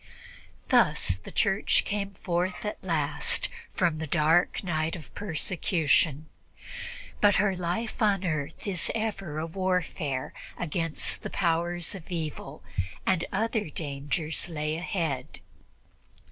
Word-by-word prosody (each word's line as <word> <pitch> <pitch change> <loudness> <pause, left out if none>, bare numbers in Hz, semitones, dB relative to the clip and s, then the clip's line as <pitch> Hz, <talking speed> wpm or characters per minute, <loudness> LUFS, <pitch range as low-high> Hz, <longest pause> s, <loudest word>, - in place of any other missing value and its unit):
Thus 90 - +3
the 95 - -10
Church 195 0 +3
came 200 -1 -2
forth 180 +2 -1
at 210 - -4
last 155 -5 +3 0.3
from 170 -3 +2
the 160 - -3
dark 160 +5 +3
night 160 -3 0
of 155 -7 -10
persecution, 160 -4 +1 0.9
but 205 -1 +6
her 195 -1 +3
life 180 +8 -2
on 200 -3 +3
earth 155 -2 -2
is 190 -4 +1
ever 195 -8 -2
a 155 - -1
warfare 165 -6 -1 0.2
against 165 -1 0
the - - -4
powers 175 -1 0
of 190 -2 -9
evil, 155 - -4 0.4
and 185 -3 +2
other 220 -2 0
dangers 150 +1 -2
lay 155 -1 -1
ahead. 165 -5 -2
170 Hz, 120 wpm, -28 LUFS, 155-190 Hz, 0.9 s, but